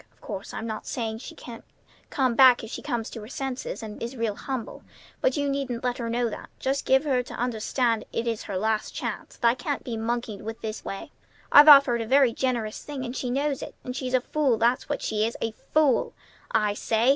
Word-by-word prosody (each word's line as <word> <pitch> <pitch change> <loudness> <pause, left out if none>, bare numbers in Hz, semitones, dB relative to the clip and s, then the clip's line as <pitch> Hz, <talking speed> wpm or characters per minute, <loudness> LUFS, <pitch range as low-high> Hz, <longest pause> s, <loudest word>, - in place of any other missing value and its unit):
Of - - -33
course, 200 -2 -6
I'm 225 - -5
not 220 -1 -5
saying 225 -2 -3
she - - -9
can't 235 -2 -10 0.5
come 260 -3 +1
back 255 0 +7
if 225 - -8
she - - -5
comes 240 -5 -2
to 225 - -7
her 210 - -9
senses, 265 -2 -4
and 210 -1 -8
is 235 +3 -5
real 230 -2 0
humble; 255 +1 -5 0.4
but - - +2
you 285 0 0
needn't 275 -4 -2
let 250 0 -1
her 230 -1 -2
know 240 +1 +1
that. - - -8
Just 270 +1 -1
give 265 +2 +5
her 265 -4 +2
to 245 - -9
understand 235 0 0
it 230 - -2
is 230 -2 -1
her 195 -3 -3
last 215 +2 -1
chance, - - -5
that 235 - +2
I 230 - +5
can't 265 +3 -3
be 235 -3 -4
monkeyed 225 -2 -3
with 225 +1 -6
this 215 0 -5
way. 195 - -6 0.4
I've 290 +1 +9
offered 275 -5 +8
her 225 - -4
a - - -12
very 265 -3 +5
generous 235 -5 -1
thing, 280 -3 -5
and 245 +1 -5
she 250 - -2
knows 275 +2 0
it, - - -7
and 250 - -5
she's 255 -1 -1
a 255 - +3
fool, 275 -3 +1
that's 235 +3 +1
what - - -2
she 215 -1 0
is, 230 +1 -1
a 225 - -1 0.2
fool 300 -5 +3 0.3
I 210 -2 +2
say!" 225 +3 +1
240 Hz, 235 wpm, -26 LUFS, 225-265 Hz, 0.5 s, I've